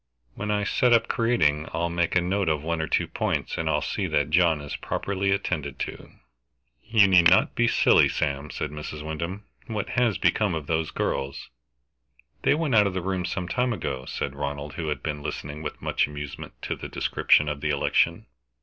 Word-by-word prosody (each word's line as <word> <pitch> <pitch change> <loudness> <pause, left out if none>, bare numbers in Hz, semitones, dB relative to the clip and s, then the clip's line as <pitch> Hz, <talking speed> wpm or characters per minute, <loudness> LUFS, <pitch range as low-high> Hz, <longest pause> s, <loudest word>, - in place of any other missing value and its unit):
When 105 +9 -5
I 105 -1 +1
set 120 +4 +3
up 115 - +4
creating 80 -11 +1
I'll 85 +1 -1
make 85 0 0
a 90 - +5
note 95 0 0
of 75 -1 0
one 85 0 -1
or 80 - -2
two - - +1
points, - - -2
and 80 -1 -2
I'll 75 -1 +1
see - - -2
that 75 +1 0
John 85 -2 +4
is 75 -1 -6
properly 100 0 -2
attended 75 -8 -1
to." - - -6 0.7
"You 110 -3 +5
need 90 -3 +6
not 95 +5 +4
be 120 - +2
silly, - - +5
Sam," 70 0 -2
said - - -4
Mrs. 75 0 -7
Wyndham. 85 +6 -4 0.2
"What 110 -4 -3
has 120 -4 +1
become 105 -6 +2
of 80 -2 -4
those 80 +1 -1
girls?" 70 0 -3 0.9
"They - - +3
went 155 -4 -1
out 105 -2 +6
of 95 - -4
the 90 - -2
room 95 -1 -1
some 90 0 -3
time 125 +5 0
ago," 65 - -4
said 70 - -4
Ronald, 70 0 -4
who 80 0 -4
had 75 -4 -3
been 75 -2 -3
listening 75 +1 -5
with 80 - -6
much - - +1
amusement 75 -2 -7
to - - -2
the - - -8
description 75 - +2
of 75 -1 -3
the 75 - -1
election. 70 -1 +1
80 Hz, 200 wpm, -26 LUFS, 75-100 Hz, 0.9 s, need